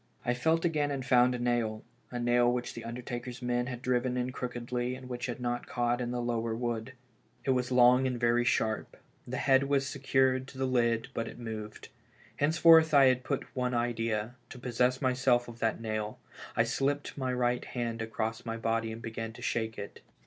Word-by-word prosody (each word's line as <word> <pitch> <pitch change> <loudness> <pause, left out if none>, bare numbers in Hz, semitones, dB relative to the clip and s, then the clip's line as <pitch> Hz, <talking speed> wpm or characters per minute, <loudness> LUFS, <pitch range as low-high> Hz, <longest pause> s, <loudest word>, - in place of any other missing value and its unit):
I 120 - +2
felt 160 +7 +1
again, 150 -3 +1
and 135 -2 -3
found 125 -1 +4
a - - -2
nail 120 -3 -1
— - - -36
a 125 - -4
nail 120 0 +3
which 125 0 -3
the 115 - -7
undertaker's 120 +1 -6
men 120 0 0
had 125 -1 -6
driven 125 0 +1
in 125 0 -1
crookedly 125 0 -3
and 130 0 -10
which 125 0 -4
had 120 - -4
not 120 0 -2
caught 120 0 0
in 120 - -2
the 120 0 -2
lower 115 -1 -1
wood. 120 +1 -3 0.5
It 135 - +3
was 125 -1 0
long 125 +1 +6
and 125 -2 -2
very 120 0 +3
sharp; 110 -2 0 0.3
the - - -3
head 135 0 +4
was 140 -1 +2
secured 130 -2 +1
to 140 - -12
the 135 - 0
lid, 120 -3 +1
but 115 0 -2
it - - -9
moved. 110 -3 -7 0.5
Henceforth 160 +1 +6
I 140 -1 +8
had 130 0 +1
but 140 -1 -2
one 125 -1 0
idea 115 -1 -1
— - - -37
to - - -9
possess 125 +2 0
myself 125 -1 +2
of 120 -1 -10
that 115 -2 0
nail; 110 -1 -3 0.4
and - - +4
I - - +5
slipped 140 +5 -1
my 130 -2 -2
right 125 -1 0
hand 115 -2 -3
across 115 +1 -3
my 115 -1 -4
body 115 0 -1
and 115 +1 -8
began 115 0 -5
to - - -11
shake 110 -1 -1
it. 100 - -8
120 Hz, 205 wpm, -30 LUFS, 115-130 Hz, 0.5 s, I